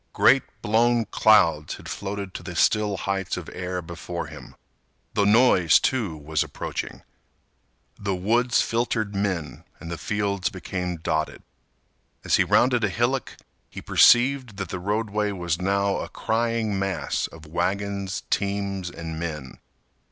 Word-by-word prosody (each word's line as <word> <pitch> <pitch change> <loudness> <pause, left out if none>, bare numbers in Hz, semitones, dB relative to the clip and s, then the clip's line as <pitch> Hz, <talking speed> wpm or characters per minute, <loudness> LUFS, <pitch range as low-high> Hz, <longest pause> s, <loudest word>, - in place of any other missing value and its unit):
Great - - +5 0.2
blown 115 +2 +3
clouds 85 -9 +3
had - - -12
floated 100 -1 -5
to - - -6
the 90 - -8
still 105 +3 +2
heights 95 -1 -2
of - - -7
air 90 -1 -4
before 85 +1 -6
him. - - -11 0.6
The 100 - +2
noise, 105 -7 +5
too, 110 -12 -1
was 75 +1 -1
approaching. - - -6 1.0
The 100 -2 -1
woods 120 +6 +2
filtered 115 -3 -1
men 100 -5 -2 0.2
and 85 - -8
the 85 - -5
fields 100 -2 -1
became 90 -1 -4
dotted. 80 -1 -2 0.8
As - - +3
he - - +4
rounded 125 -2 +3
a 105 - +2
hillock, 120 +5 -1 0.3
he - - -8
perceived 125 -3 +4
that 100 -4 -4
the 95 - -4
roadway 105 +2 -1
was 85 -2 -2
now 100 +1 +1
a - - -5
crying 115 -2 -1
mass 95 -1 -1
of 80 -1 -14
wagons, 95 +4 -2
teams, 100 -2 -1
and 80 -2 -6
men. 75 -6 -6
100 Hz, 140 wpm, -25 LUFS, 90-110 Hz, 1.0 s, Great